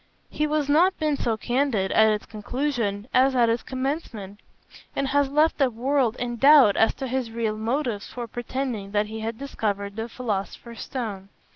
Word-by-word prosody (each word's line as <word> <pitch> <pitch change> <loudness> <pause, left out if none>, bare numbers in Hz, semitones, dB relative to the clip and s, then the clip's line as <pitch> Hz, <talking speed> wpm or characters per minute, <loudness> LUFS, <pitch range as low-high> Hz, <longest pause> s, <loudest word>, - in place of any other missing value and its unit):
He 305 - 0
has 300 -1 0
not 340 +6 +4
been 305 -2 0
so 230 -5 -1
candid 240 -6 0
at 220 0 +5
its 210 0 -2
conclusion 225 -2 -3
as 260 +1 +4
at 240 -2 +4
its 230 +1 +1
commencement, 255 - -4 0.6
and 275 -1 -1
has 285 0 +2
left 300 +3 +2
the 270 -2 +4
world 250 0 0
in 240 -1 -4
doubt 275 -5 +7
as 225 - +3
to 270 - -5
his 255 -2 -2
real 225 -1 -2
motives 230 -1 -2
for 240 -1 -6
pretending 240 -3 -4
that 210 0 +2
he 220 +1 -7
had 220 +1 -4
discovered 205 -7 -3
the 225 +1 -4
philosopher's 230 0 -5
stone. 210 -7 -5
240 Hz, 175 wpm, -25 LUFS, 215-275 Hz, 0.6 s, doubt